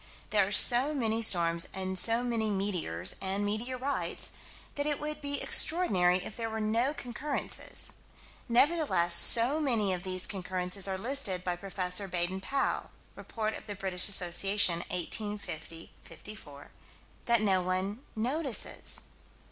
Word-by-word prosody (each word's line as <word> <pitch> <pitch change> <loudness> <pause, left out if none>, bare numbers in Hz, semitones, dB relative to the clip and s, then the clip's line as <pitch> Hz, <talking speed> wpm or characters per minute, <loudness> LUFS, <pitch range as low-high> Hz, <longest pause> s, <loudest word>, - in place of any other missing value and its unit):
There 205 -3 +2
are - - -7
so 250 +8 +5
many 225 -4 -2
storms 170 -5 +6
and 190 0 -4
so 230 +5 +5
many 230 -3 -2
meteors 180 - -2
and 195 +2 -3
meteorites 250 +6 -4 0.4
that 285 0 -4
it 295 -1 -2
would 300 0 -6
be 285 0 -3
extraordinary 185 - +4
if 185 +2 -8
there 225 -1 -5
were 220 0 -5
no 225 +5 -1
concurrences. 275 +1 0 0.6
Nevertheless 235 - +1
so 235 - +6
many 230 -10 -1
of 180 - -5
these 185 -1 +1
concurrences 185 0 -5
are 190 -1 -4
listed 205 -5 -3
by 180 -1 -3
Prof. 190 +2 -12 0.3
Baden 180 +2 -3
Powell 275 +7 -3 0.3
(Rept. - - -15 0.4
Brit. 190 -1 -5
Assoc., 180 -1 +1
1850 180 -2 -2
54) 145 -10 -12 0.6
that 210 -6 +1
one 185 +4 -3 0.2
notices. 260 +3 0
205 Hz, 125 wpm, -29 LUFS, 185-240 Hz, 0.6 s, storms